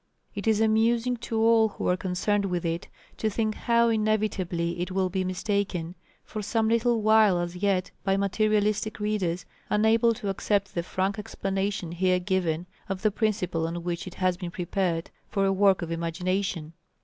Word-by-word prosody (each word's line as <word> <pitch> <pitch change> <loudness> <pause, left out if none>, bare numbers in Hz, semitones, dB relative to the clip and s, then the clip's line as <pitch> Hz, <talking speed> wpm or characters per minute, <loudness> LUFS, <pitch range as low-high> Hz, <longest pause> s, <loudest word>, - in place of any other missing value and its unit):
It 205 +2 -5
is 220 -1 +3
amusing 225 +2 +2
to 230 -1 -3
all 225 0 +5
who - - -4
are 180 - +3
concerned 195 +2 0
with 180 -2 -2
it, 165 0 -2 0.3
to 220 - 0
think 215 +1 0
how 235 +1 +2
inevitably 210 -6 0
it 175 - -2
will 190 0 0
be 190 0 0
mistaken 185 -2 -2 0.3
for 215 - -5
some 220 +2 0
little 230 -1 +2
while 215 -3 +5
as 175 0 -3
yet, 190 -1 0
by 195 -1 +2
materialistic 215 +2 +1
readers, 190 -5 -1 0.2
unable 225 +2 +3
to 205 - -4
accept 195 0 0
the 170 - -1
frank 190 +4 -2
explanation 195 -3 -2
here 185 +1 +2
given 175 -2 -1 0.2
of 195 -1 -3
the 215 - +3
principle 190 -7 0
on 170 +1 -5
which 175 +1 -3
it 185 - -8
has 185 -1 +1
been 180 -2 -5
prepared 175 -1 -2 0.2
for 195 -2 +1
a 195 - +2
work 195 -2 +3
of 170 - -5
imagination. 170 0 -2
195 Hz, 175 wpm, -27 LUFS, 180-215 Hz, 0.3 s, all